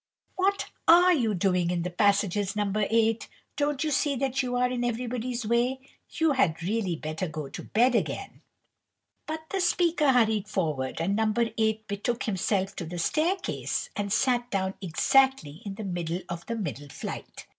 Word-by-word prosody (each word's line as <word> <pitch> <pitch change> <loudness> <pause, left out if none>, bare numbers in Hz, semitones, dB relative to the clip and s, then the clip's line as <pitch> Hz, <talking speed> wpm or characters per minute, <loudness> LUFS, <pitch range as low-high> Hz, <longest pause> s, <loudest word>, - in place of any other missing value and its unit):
"What 395 +1 +1 0.2
are 355 +2 +7
you 230 - +1
doing 180 -1 +1
in 175 -1 -1
the 180 - -3
passages, 200 +1 +1
No. 205 -2 0
8? 225 +2 +2 0.3
Don't 290 0 0
you 310 - -1
see 280 0 +1
that 270 0 0
you 250 -1 -2
are 250 0 +3
in 250 -1 -2
everybody's 240 0 -2
way? 240 +4 +1 0.3
You 320 -2 +1
had 175 - +1
really 195 -2 0
better 155 +3 -4
go 155 -3 -6
to - - -7
bed 245 +4 +2
again." 230 - -2 0.9
But 315 0 -3
the 390 - 0
speaker 340 -4 +3
hurried 220 -4 +2
forward, 155 -10 -2
and 185 +5 0
No. 220 0 +2 0.2
8 220 -1 0
betook 215 +4 -2
himself 195 -1 -1
to 175 - -4
the 175 +2 -6
staircase, 330 - -1
and 200 -1 -2
sat 245 +2 +2
down 190 -2 -1
exactly 190 - +2
in 195 - -5
the 215 - -6
middle 175 -2 -3
of 170 0 -6
the 230 - -2
middle 145 - -5
flight. - - -7
220 Hz, 170 wpm, -27 LUFS, 185-255 Hz, 0.9 s, are